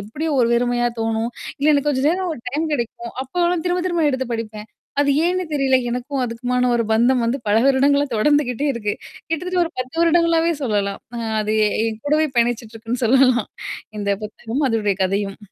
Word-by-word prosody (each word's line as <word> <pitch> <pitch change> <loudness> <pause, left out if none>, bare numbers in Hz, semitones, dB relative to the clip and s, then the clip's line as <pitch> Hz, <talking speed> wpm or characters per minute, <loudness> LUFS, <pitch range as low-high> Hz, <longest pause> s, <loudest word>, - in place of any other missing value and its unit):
எப்பிடியோ 295 +11 -4
ஒரு 235 - +3
வெறுமையா 240 0 +1
தோணும். 225 +1 -1 0.3
இல்ல 295 +2 +3
எனக்கு 285 0 +2
கொஞ்ச 260 -2 0
நேரம் 365 0 -1
ஒரு 240 - -11
டைம் 300 +5 -1
கிடைக்கும். 235 -2 -3
அப்போலாம் 345 +4 0
திரும்ப 355 0 0
திரும்ப 345 -3 +1
எடுத்து 260 -1 -2
படிப்பேன். 215 -1 -6 0.3
அது 285 - +3
ஏன்னு 365 +1 +1
தெரியல. 270 -2 +3
எனக்கும் 250 +2 -2
அதுக்குமான 250 +1 -1
ஒரு 230 - +1
பந்தம் 240 +2 +3
வந்து 235 +4 0
பல 205 - +3
வருடங்களா 280 +1 +3
தொடர்ந்துக்கிட்டே 285 +2 +2
இருக்கு. 210 -3 -2 0.3
கிட்டத்தட்ட 360 +3 -2
ஒரு 335 - -7
10 255 +5 -7
வருடங்களாவே 335 0 +3
சொல்லலாம். 205 -5 -1 0.2
அ - - -3 0.2
அது 215 +1 -1
எ - - +3 0.2
என் 220 0 -4
கூடவே 305 +1 +2
பயணிச்சுட்டு 235 -1 0
இருக்குன்னு 235 +2 -3
சொல்லலாம். 255 -1 +4 0.5
இந்த 200 -1 -1
புத்தகமும், 225 +6 -3
அதோடைய 210 -4 0
கதையும். 195 +1 -2
250 Hz, 175 wpm, -21 LUFS, 225-300 Hz, 0.5 s, சொல்லலாம்